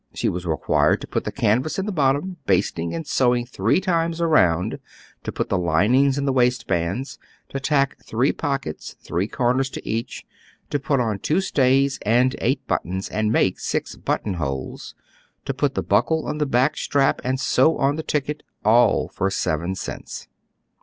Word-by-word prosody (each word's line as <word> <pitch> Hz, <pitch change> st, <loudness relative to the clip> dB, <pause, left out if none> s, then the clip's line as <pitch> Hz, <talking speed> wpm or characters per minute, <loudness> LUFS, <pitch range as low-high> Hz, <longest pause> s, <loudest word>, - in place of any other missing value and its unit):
She -, -, 0 dB
was 90 Hz, 0 st, -4 dB
required 80 Hz, -2 st, +2 dB
to -, -, -7 dB
put -, -, -2 dB
the -, -, -2 dB
canvas 125 Hz, +9 st, +1 dB
in 190 Hz, -, -1 dB
the 210 Hz, -, -2 dB
bottom, 150 Hz, +3 st, 0 dB
basting 90 Hz, -3 st, 0 dB
and 165 Hz, -, -4 dB
sew 125 Hz, -3 st, +2 dB
ing 120 Hz, 0 st, -2 dB
three 115 Hz, -, +1 dB
times 170 Hz, -3 st, 0 dB
aronnd; 90 Hz, -, +2 dB, 0.4 s
to -, -, -4 dB
put -, -, -3 dB
the 95 Hz, -, +1 dB
linings 115 Hz, -, +3 dB
in 140 Hz, -, -1 dB
the 135 Hz, -, +1 dB
waist 125 Hz, -1 st, +2 dB
bands; 95 Hz, -, -2 dB, 0.3 s
to 135 Hz, -, -4 dB
tack 140 Hz, 0 st, 0 dB
three 125 Hz, +5 st, +1 dB
pockets, 135 Hz, -, -4 dB
three 90 Hz, +4 st, -2 dB
comers 125 Hz, +3 st, 0 dB
to -, -, -8 dB
each; 115 Hz, +1 st, -3 dB, 0.5 s
to 145 Hz, -, 0 dB
put 140 Hz, 0 st, 0 dB
on 110 Hz, -5 st, -1 dB
two 155 Hz, -, +1 dB
stays 135 Hz, -6 st, +2 dB
and 125 Hz, +4 st, +2 dB
eight 130 Hz, +3 st, 0 dB
buttons, 95 Hz, +2 st, -2 dB
and 110 Hz, 0 st, 0 dB
make 95 Hz, -4 st, +2 dB
six -, -, -2 dB
button 100 Hz, -, -2 dB
holes; 70 Hz, -6 st, -5 dB, 0.5 s
to -, -, -2 dB
put -, -, -1 dB
the -, -, -1 dB
buckle 160 Hz, -1 st, +1 dB
on 150 Hz, -, -3 dB
the 150 Hz, -, +1 dB
back 135 Hz, +4 st, +2 dB
strap 140 Hz, -1 st, +1 dB
and 130 Hz, +1 st, -1 dB
sew 135 Hz, +4 st, +3 dB
on 140 Hz, +1 st, +2 dB
the 160 Hz, -, -3 dB
ticket, 150 Hz, -1 st, -2 dB, 0.2 s
ail 115 Hz, +3 st, +4 dB
for 95 Hz, -, 0 dB
seven 85 Hz, -1 st, -1 dB
cents." -, -, -7 dB
130 Hz, 180 wpm, -22 LUFS, 100-140 Hz, 0.5 s, ail